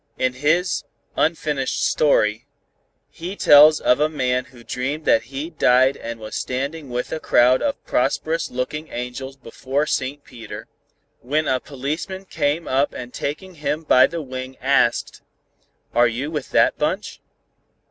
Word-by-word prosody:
In 130 Hz, 0 st, +1 dB
his 155 Hz, +8 st, +1 dB, 0.3 s
'Unfinished 150 Hz, -4 st, 0 dB
Story' 110 Hz, -8 st, +2 dB, 0.6 s
he 175 Hz, +4 st, -7 dB
tells 150 Hz, -3 st, +7 dB
of 125 Hz, -, +3 dB
a 150 Hz, +1 st, +2 dB
man 125 Hz, -4 st, -1 dB
who 120 Hz, -2 st, -16 dB
dreamed 140 Hz, +6 st, -3 dB
that 115 Hz, +1 st, +3 dB
he 140 Hz, +6 st, -6 dB
died 130 Hz, -3 st, +4 dB
and 115 Hz, 0 st, -7 dB
was 110 Hz, 0 st, -7 dB
standing 140 Hz, +3 st, -3 dB
with 125 Hz, 0 st, -3 dB
a 160 Hz, -, -2 dB
crowd 125 Hz, -3 st, +4 dB
of 280 Hz, -, -2 dB
prosperous 160 Hz, +5 st, 0 dB
looking 150 Hz, +5 st, -4 dB
angels 130 Hz, +2 st, -6 dB
before 135 Hz, +4 st, -2 dB
Saint 140 Hz, 0 st, -2 dB
Peter, 115 Hz, -4 st, -10 dB, 0.5 s
when 150 Hz, +5 st, -1 dB
a 130 Hz, -1 st, +1 dB
policeman 150 Hz, +9 st, -5 dB
came 155 Hz, -1 st, -1 dB
up 135 Hz, +2 st, +1 dB
and 125 Hz, 0 st, -7 dB
taking 180 Hz, +6 st, -5 dB
him 150 Hz, 0 st, -3 dB
by 130 Hz, -4 st, +6 dB
the 170 Hz, -1 st, -5 dB
wing 130 Hz, -1 st, -7 dB
asked: 130 Hz, -3 st, +1 dB, 0.7 s
'Are 120 Hz, 0 st, +5 dB
you 125 Hz, +6 st, -3 dB
with 150 Hz, -4 st, -4 dB
that -, -, +3 dB
bunch?' -, -, -2 dB
140 Hz, 145 wpm, -22 LUFS, 125-155 Hz, 0.7 s, tells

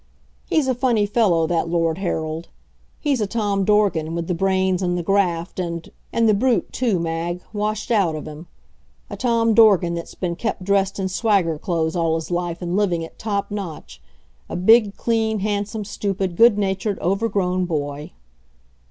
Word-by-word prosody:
He's 300 Hz, -4 st, +2 dB
a 260 Hz, -, +2 dB
funny 240 Hz, -4 st, +1 dB
fellow, 200 Hz, -6 st, +2 dB
that 165 Hz, 0 st, 0 dB
Lord 165 Hz, 0 st, 0 dB
Harold. 160 Hz, -3 st, -3 dB, 0.5 s
He's 280 Hz, -6 st, 0 dB
a 210 Hz, -, 0 dB
Tom 205 Hz, -2 st, 0 dB
Dorgan, 190 Hz, -6 st, +2 dB
with 170 Hz, 0 st, -2 dB
the 180 Hz, -, -1 dB
brains 190 Hz, +1 st, +1 dB
and 175 Hz, -1 st, 0 dB
the 175 Hz, -, -2 dB
graft 180 Hz, -2 st, 0 dB
and 170 Hz, -2 st, -4 dB, 0.2 s
and 230 Hz, -1 st, +2 dB
the 215 Hz, -, +5 dB
brute, 240 Hz, +4 st, +1 dB
too, 235 Hz, -7 st, +1 dB
Mag, 170 Hz, +1 st, -3 dB
washed 215 Hz, +2 st, -2 dB
out 195 Hz, -8 st, +2 dB
of 155 Hz, -, -6 dB
him; 155 Hz, +3 st, -9 dB, 0.6 s
a -, -, -4 dB
Tom 230 Hz, -2 st, +2 dB
Dorgan 200 Hz, -6 st, +5 dB
that's 170 Hz, 0 st, -6 dB
been 175 Hz, -2 st, -3 dB
kept 210 Hz, 0 st, -3 dB
dressed 195 Hz, 0 st, +1 dB
in 190 Hz, -1 st, -1 dB
swagger 190 Hz, -5 st, +1 dB
clothes 165 Hz, -1 st, -1 dB
all 165 Hz, -2 st, +1 dB
his 165 Hz, +2 st, -5 dB
life 175 Hz, 0 st, -2 dB
and 175 Hz, +1 st, -2 dB
living 180 Hz, -5 st, +1 dB
at -, -, -16 dB
top 200 Hz, -2 st, -2 dB
notch 155 Hz, -, -7 dB, 0.5 s
a -, -, -4 dB
big, 205 Hz, +3 st, +4 dB
clean, 220 Hz, -2 st, 0 dB
handsome, 205 Hz, +1 st, -2 dB
stupid, 195 Hz, -3 st, -2 dB
good 230 Hz, +1 st, +6 dB
natured, 195 Hz, 0 st, -1 dB
overgrown 185 Hz, -1 st, 0 dB
boy. 145 Hz, -3 st, -4 dB
190 Hz, 170 wpm, -21 LUFS, 170-210 Hz, 0.6 s, good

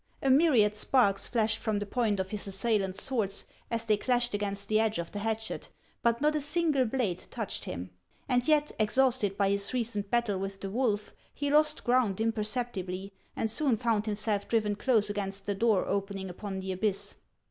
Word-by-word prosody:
A 270 Hz, -, +4 dB
myr 305 Hz, +3 st, +5 dB
iad 210 Hz, -2 st, +4 dB
sparks 210 Hz, -2 st, +3 dB
flashed 220 Hz, -2 st, +1 dB
from 215 Hz, -2 st, -1 dB
the 205 Hz, -, -2 dB
point 210 Hz, -2 st, 0 dB
of 190 Hz, 0 st, -3 dB
his 210 Hz, -1 st, -3 dB
assailants' 195 Hz, -1 st, 0 dB
swords 215 Hz, -7 st, 0 dB, 0.2 s
as 230 Hz, -1 st, -2 dB
they 215 Hz, -2 st, +3 dB
clashed 245 Hz, +1 st, +1 dB
against 200 Hz, -1 st, -3 dB
the 215 Hz, 0 st, +2 dB
edge 220 Hz, -1 st, +1 dB
of 170 Hz, -1 st, -4 dB
the 205 Hz, -, -5 dB
hatchet; 220 Hz, +1 st, -3 dB, 0.3 s
but 235 Hz, +1 st, +1 dB
not 300 Hz, +1 st, +3 dB
a 300 Hz, -, 0 dB
single 295 Hz, -2 st, +1 dB
blade 225 Hz, -7 st, -2 dB
touched -, -, -4 dB
him. 90 Hz, +2 st, -6 dB, 0.4 s
And 245 Hz, -1 st, +1 dB
yet, 300 Hz, -1 st, +3 dB
exhausted 220 Hz, -2 st, +2 dB
by 200 Hz, -1 st, +2 dB
his 200 Hz, +5 st, +1 dB
recent 215 Hz, -4 st, -2 dB
battle 235 Hz, -5 st, +1 dB
with 195 Hz, 0 st, -5 dB
the 195 Hz, -, -5 dB
wolf, 215 Hz, -3 st, -1 dB, 0.2 s
he 285 Hz, 0 st, -2 dB
lost 300 Hz, +1 st, +3 dB
ground 240 Hz, -6 st, +2 dB
impercep 225 Hz, +2 st, -1 dB
tibly, 185 Hz, +1 st, -5 dB, 0.2 s
and -, -, 0 dB
soon 240 Hz, +2 st, +2 dB
found 220 Hz, -2 st, 0 dB
himself 210 Hz, -1 st, -1 dB
driven 215 Hz, -3 st, +1 dB
close 215 Hz, -1 st, +2 dB
against 200 Hz, -1 st, -4 dB
the 205 Hz, -, 0 dB
door 210 Hz, -1 st, +2 dB
opening 195 Hz, -1 st, -3 dB
upon 190 Hz, +1 st, -5 dB
the 190 Hz, 0 st, -4 dB
abyss. 200 Hz, +1 st, -1 dB
215 Hz, 190 wpm, -29 LUFS, 200-245 Hz, 0.4 s, myr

